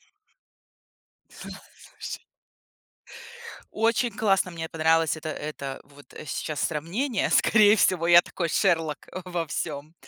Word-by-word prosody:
Слу - - -34 1.6
слушай - - -10 1.5
Очень 230 +2 +1
классно, 195 -4 +1
мне 165 -1 -6
понравилось 160 0 +1
это 160 0 -6
это 140 -3 -6
вот 145 0 -18 0.2
сейчас 150 0 -4
сравнение. 190 - -1
Скорее 210 -2 +5
всего, 175 -3 +2
я 175 0 +8
такой 170 -2 -4
Шерлок 165 -6 +1 0.3
во 175 -3 -3
всём. 150 +1 -5
165 Hz, 105 wpm, -25 LUFS, 155-195 Hz, 1.6 s, я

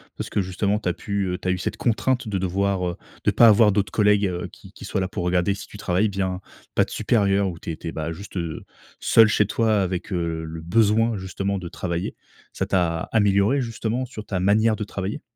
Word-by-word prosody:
Parce - - -5
que 105 - 0
justement, 100 +2 0
tu 110 - -5
as - - 0
pu, 100 -2 -2
heu, 90 -1 -2
tu - - -6
as - - +2
eu 90 - 0
cette 90 - -3
contrainte 120 +1 0
de 100 -2 -1
devoir, 95 0 0
heu, 85 - -4 0.3
de - - +3
pas 120 - +6
avoir 105 -1 +6
d'autres 100 0 0
collègues, 105 -1 +3
heu, 90 -1 -3
qui - - -15
qui - - -10
soient 95 - -1
là 95 - 0
pour 90 - -4
regarder 90 +2 +1
si - - -8
tu - - -12
travailles 100 +2 +1
bien, 95 -2 -2 0.4
pas - - +5
de - - -14
supérieur 100 -3 +2
où 85 - -7
tu 85 - -6
étais, 80 +1 -6
bah, 80 +1 -4
juste 100 +3 -8 0.6
seule 115 -1 +6
chez 105 -1 +2
toi 110 -2 +2
avec, 90 +1 -3
heu, 85 -2 -2
le 80 0 -7
besoin, 110 +4 +2
justement, 95 +1 -3
de 90 -2 -6
travailler. 85 0 -4 0.4
Ça - - -2
t'a 85 -3 0
améliorée, 105 +4 +3
justement, 120 +1 -2
sur 115 -4 -8
ta 95 -3 -3
manière 110 +4 +3
de 105 - -4
travailler? 100 0 -4
100 Hz, 225 wpm, -23 LUFS, 90-105 Hz, 0.6 s, pas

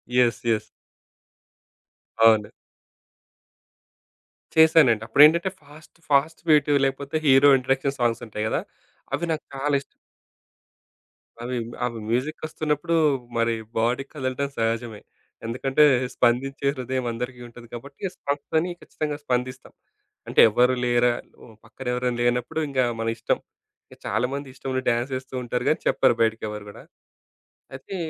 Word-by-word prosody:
Yes. 125 -2 +3
Yes. 110 -1 0 1.6
అవును. 110 -2 +5 2.0
చేసానండి. 155 -8 +5
అప్పుడెంటంటే 160 +7 +6
fast 150 +3 -17
fast 145 +3 +2
beat 150 -1 +4
లేకపోతే 140 +2 -3
హీరో 135 0 +6
ఇంట్రోడక్షన్ 135 +2 -1
సాంగ్స్ 120 -1 0
ఉంటాయి 105 0 -4
గదా! - - -1 0.5
అవి 170 - -1
నాకు 155 - -6
చాలా 145 +2 -1
ఇష్టం. - - -22 1.5
అవి 125 +1 -3 0.3
అవి 115 -2 -4
మ్యూజిక్ 130 +8 -2
ఒస్తున్నప్పుడు 155 +1 -1 0.4
మరి 115 0 +1 0.2
బాడీ 120 +4 +1
కదలడం 140 -1 -2
సహజమే. 115 -1 -2 0.4
ఎందుకంటే 135 +5 +1 0.3
స్పందించే 135 +3 +1
హృదయం 130 -1 -3
అందరికీ 125 +2 -5
ఉంటుంది 120 0 -14
కాబట్టి 140 +4 -10
స్పందని 160 +4 -2
ఖచ్చితంగా 150 -1 -4
స్పందిస్తాం. 125 -1 -3 0.5
అంటే - - 0
ఎవరు 125 +4 +3
లేరా? 120 0 +3 0.3
ఓహ్! 115 - -15
పక్కన 130 +3 -10
ఎవరైనా 125 -1 -1
లేనప్పుడు 120 +4 0
ఇంగ 135 -2 -3 0.2
మన 115 - -2
ఇష్టం. 115 - 0 0.5
ఇంక - - -13
చాలామంది 135 +5 -2
ఇష్టమున్న 130 0 -3
డ్యాన్స్ 120 +3 -1
ఏస్తూ 130 0 -12
ఉంటారు 125 0 -2
గానీ 155 - +1
చెప్పరు 135 -2 +3
బయటికి 110 0 +1
ఎవరు 105 -1 -7
గూడా. - - -12 0.9
అయితే 135 +8 -8
130 Hz, 120 wpm, -24 LUFS, 120-140 Hz, 2.0 s, అప్పుడెంటంటే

